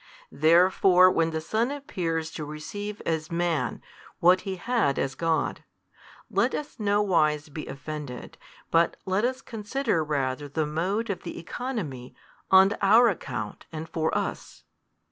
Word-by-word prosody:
Therefore 180 +3 +5
when 165 -2 +2
the 160 -1 -2
Son 220 +9 0
appears 165 - -3
to 155 - -6
receive 205 +8 -6
as 160 -1 -2
Man 170 -2 -1 0.4
what 180 +2 +5
He 195 -2 -4
had 215 - 0
as 135 - -1
God, 165 +3 -1 0.6
let - - +1
us 295 -4 -6
no 205 0 +2
wise 155 -5 +1
be 150 +1 -7
offended 140 -1 -7 0.3
but 165 0 +3
let 190 +3 0
us 255 +1 -1
consider 225 - -1
rather 145 -1 -2
the 155 +2 -1
mode 190 +9 -1
of 185 - -5
the 170 - -7
oeconomy 170 - -5 0.3
on 190 +2 +7
our 225 +4 +6
account 125 - -5
and 160 0 -6
for 160 -1 -1
us. - - -5
170 Hz, 145 wpm, -26 LUFS, 155-205 Hz, 0.6 s, on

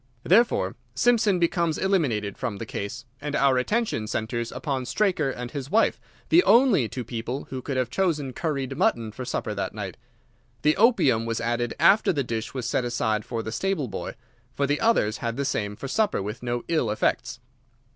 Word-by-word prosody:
Therefore 190 - +3 0.2
Simpson 225 - +3
becomes 170 -2 +1
eliminated 135 - 0
from 120 -6 -4
the 115 - -5
case, 110 +3 -5 0.2
and 145 0 -3
our 135 -2 +4
attention 205 - -1
centres 115 +2 -2
upon 135 -4 -3
Straker 170 - +1
and 125 -2 -5
his 140 -1 -5
wife, 225 +5 +2 0.3
the 350 +2 +6
only 225 - +5
two 125 +4 -5
people 120 +3 -4
who 130 -1 -4
could 135 0 -3
have 125 -2 0
chosen 150 -9 0
curried 140 -5 -2
mutton 115 -2 +1
for 125 +3 -7
supper 110 -3 -2
that 100 0 -4
night. 100 -3 -5 0.7
The 150 +1 +4
opium 135 - +3
was 115 0 -1
added 120 +1 -1
after 210 - +5
the 145 -6 0
dish 115 -2 -4
was 130 -3 -4
set 125 - 0
aside 110 -3 0
for 115 -2 -3
the 110 - -5
stable 175 - -1
boy, - - -5 0.4
for 140 - +1
the 145 +1 0
others 170 - +2
had 115 0 -3
the 140 - -1
same 105 -5 -2
for 135 - -6
supper 210 +9 +1
with 105 +4 -5
no 120 -1 -2
ill 160 -9 +1
effects. 120 +3 -1
130 Hz, 185 wpm, -25 LUFS, 115-165 Hz, 0.7 s, the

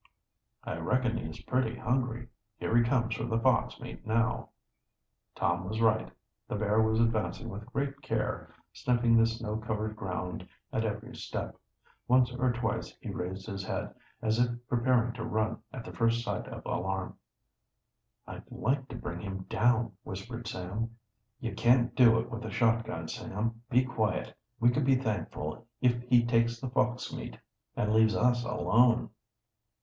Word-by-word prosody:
"I - - -3
reckon 120 +7 +1
he - - -3
is - - -9
pretty 125 -2 0
hungry. 120 -1 -1 0.3
Here - - -1
he 120 - +6
comes 115 -2 +1
for 115 0 -3
the 115 -1 0
fox 130 +1 +2
meat - - -8
now." 115 +2 +1 0.9
Tom 85 +1 +1
was 110 +1 -2
right. 110 -1 +3 0.4
The - - -3
bear 105 +1 +3
was 110 0 +2
advancing 115 +1 +1
with 105 0 -7
great 140 0 -2
care, - - -2 0.2
sniffing 120 -2 +3
the 115 0 +6
snow 110 -2 -3
covered 110 -1 -2
ground 90 -4 -4 0.3
at 110 - +1
every 105 0 -4
step. - - -4 0.5
Once 125 0 +4
or 125 0 +2
twice 120 +1 -2
he - - -5
raised 95 +2 -4
his 100 -3 -4
head, - - -3 0.3
as 110 +1 +2
if 120 0 +4 0.2
preparing 120 -1 +2
to 120 -2 -5
run 110 0 0
at 125 -3 -7
the - - -8
first 115 0 +2
sign - - -3
of - - -8
alarm. 95 +1 -2 1.1
"I'd - - -9
like 135 +2 0
to - - -8
bring 85 +1 -5
him 95 0 -5
down!" 120 -2 +3
whispered 115 +4 -6
Sam. 110 +4 -4 0.4
"You 115 -3 -3
can't 120 +2 +4
do 115 -3 +7
it 115 - -2
with 115 - -4
the 110 - -5
shotgun, 115 -6 +1
Sam. 115 +7 -3
Be 125 +2 +4
quiet! 110 -4 -1 0.2
We 120 +1 +5
can 140 +4 +1
be 135 0 +5
thankful 110 - -3
if 120 -1 +3
he 120 -1 +6
takes 115 0 +2
the 130 -1 -4
fox 125 0 0
meat - - -6 0.4
and 105 +1 +1
leaves 110 0 +5
us 120 0 +3
alone." 120 0 +3
115 Hz, 165 wpm, -31 LUFS, 110-120 Hz, 1.1 s, do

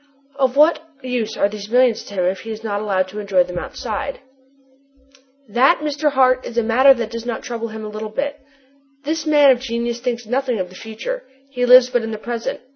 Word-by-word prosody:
"Of 265 0 +1
what 310 +3 +5 0.2
use 240 -4 -3
are 200 - +3
these 205 0 -8
millions 245 -1 +3
to 200 - -10
him 180 -2 0
if 185 +1 0
he 225 - -9
is 220 0 -6
not 205 -2 -2
allowed 190 -3 0
to 210 +3 -7
enjoy 195 -3 +2
them 180 0 -5
outside?" 235 +8 -5 1.3
"That, 255 +10 +3
Mr. 295 0 0
Hart, 255 -1 +3
is 235 - -8
a 235 - +3
matter 260 +5 +5
that 230 -2 -4
does 230 -1 -5
not 235 -1 -4
trouble 230 -1 -4
him 220 -1 -8
a - - -6
little 215 +1 -6
bit! 285 +6 -3 0.6
This 315 +2 -3
man 295 -2 +6
of 250 - +2
genius 235 -1 -3
thinks 240 -1 -3
nothing 250 +1 -1
of 180 -1 -3
the 185 - -15
future: 230 - -6 0.3
he 250 -2 -1
lives 250 0 +7
but 245 - +1
in 225 - -4
the 220 - -4
present. 230 +1 -4
235 Hz, 215 wpm, -20 LUFS, 215-260 Hz, 1.3 s, lives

